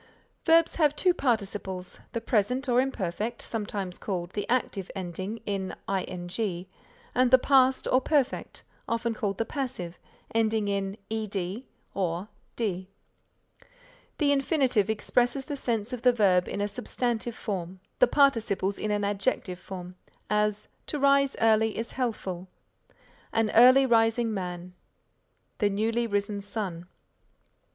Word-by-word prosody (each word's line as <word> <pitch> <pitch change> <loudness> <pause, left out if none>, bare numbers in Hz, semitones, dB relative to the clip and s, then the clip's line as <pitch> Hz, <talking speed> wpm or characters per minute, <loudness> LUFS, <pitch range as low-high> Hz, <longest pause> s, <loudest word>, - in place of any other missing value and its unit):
Verbs 330 0 +4
have 300 -3 +3
two 360 +2 +3
participles, 200 - -2
the 230 - -2
present 250 +4 +1
or 245 0 +4
imperfect, 230 -2 -3
sometimes 205 -4 -4
called 180 -3 -3
the 205 - -4
active 225 -6 0
ending 190 +4 -4
in 195 -2 -3
ing 180 0 -3 0.5
and 255 0 +3
the 260 - +8
past 260 0 +3
or 255 - +4
perfect, 275 -2 0 0.3
often 230 0 0
called 200 -3 -2
the 225 - 0
passive, 205 - -4 0.3
ending 220 -2 +2
in 200 0 -2
ed 210 +1 -3 0.3
or 185 +1 -2 0.3
d. 190 -5 -2 1.3
The 290 -3 +3
infinitive 270 - +2
expresses 245 +4 +1
the 290 - -4
sense 235 -3 -2
of 245 - -4
the 250 - +6
verb 190 -6 +3
in 200 - -3
a 205 - +1
substantive 240 +1 -2
form, 185 -2 -4 0.2
the - - +7
participles 220 -8 +2
in 215 - -2
an 205 0 0
adjective 200 -2 -1
form; 180 -1 -8 0.4
as 210 0 +1 0.2
"To 300 - -2
rise 275 -1 +4
early 220 -1 +3
is 230 +1 -3
healthful." 195 -8 -3 0.8
"An 225 -1 +1
early 255 +4 +8
rising 225 -1 +3
man." 180 -2 -5 0.9
"The 205 - +3
newly 225 +4 0
risen 205 -1 -1
sun." 195 -4 -5
215 Hz, 130 wpm, -28 LUFS, 195-245 Hz, 1.3 s, the